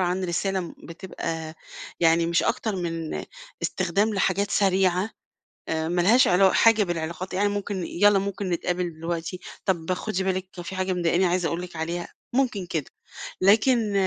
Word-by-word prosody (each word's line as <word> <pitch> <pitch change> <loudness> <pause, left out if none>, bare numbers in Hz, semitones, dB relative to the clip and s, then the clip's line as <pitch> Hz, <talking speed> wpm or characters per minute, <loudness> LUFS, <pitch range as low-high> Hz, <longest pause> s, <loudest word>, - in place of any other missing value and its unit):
عن 185 +1 0
رسالة 185 0 -2
بتبقى 165 -2 -6 0.5
يعني 165 0 +4
مش 170 +1 +2
أكتر 215 -4 -1
من 165 -2 -3 0.4
استخدام 190 +5 0
لحاجات 195 +1 +1
سريعة، 190 0 +2 0.6
آآ 160 0 -1
مالهاش 185 +9 +4
علا 190 +1 +5
حاجة 225 -2 +5
بالعلاقات، 175 +1 -4
يعني 205 +2 +2
ممكن 205 -3 -3
يالّا 205 +2 +4
ممكن 200 0 -3
نتقابل 175 0 -1
دلوقتي، 165 +2 -4 0.3
طب 185 -2 0
خُدي 190 0 -2
بالِك 190 0 -1 0.2
في 175 +3 -6
حاجة 185 0 0
مضايقاني 175 +1 +2
عايزة 175 -1 +1
أقول 170 +1 -2
لِك 180 -1 -9
عليها، 170 +2 -3 0.3
ممكن 245 -8 +1
كده. 160 -5 -4 0.5
لكن 215 +2 +4
185 Hz, 145 wpm, -25 LUFS, 170-195 Hz, 0.6 s, علا